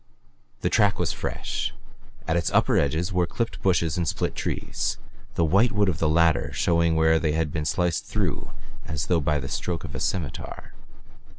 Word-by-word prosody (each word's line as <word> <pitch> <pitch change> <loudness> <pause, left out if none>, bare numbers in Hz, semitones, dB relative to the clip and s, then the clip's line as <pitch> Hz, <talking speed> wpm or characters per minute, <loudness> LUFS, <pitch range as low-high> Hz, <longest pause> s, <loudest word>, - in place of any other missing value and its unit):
The - - +1
track 100 -1 +3
was - - 0
fresh. - - -3 0.5
At 80 - +1
its 85 -2 +1
upper - - +4
edges 80 +6 +1
were 90 -1 +2
clipped 115 +3 -3
bushes 85 -4 +2
and 85 -2 0
split - - -1
trees, - - -2 0.4
the 85 - +3
white 100 +9 +4
wood 105 -2 +2
of 80 - -2
the 80 - +2
latter 85 0 +3
showing 85 -1 +2
where 80 0 +4
they 75 -2 0
had 80 -2 0
been 75 -1 -2
sliced 85 +1 -1 0.7
as 75 -2 -2
though 85 -3 +2
by 75 +1 +1
the 70 - -4
stroke 85 -2 -3
of - - -7
a - - -4
scimitar. 80 -10 -4
85 Hz, 180 wpm, -25 LUFS, 80-90 Hz, 0.7 s, upper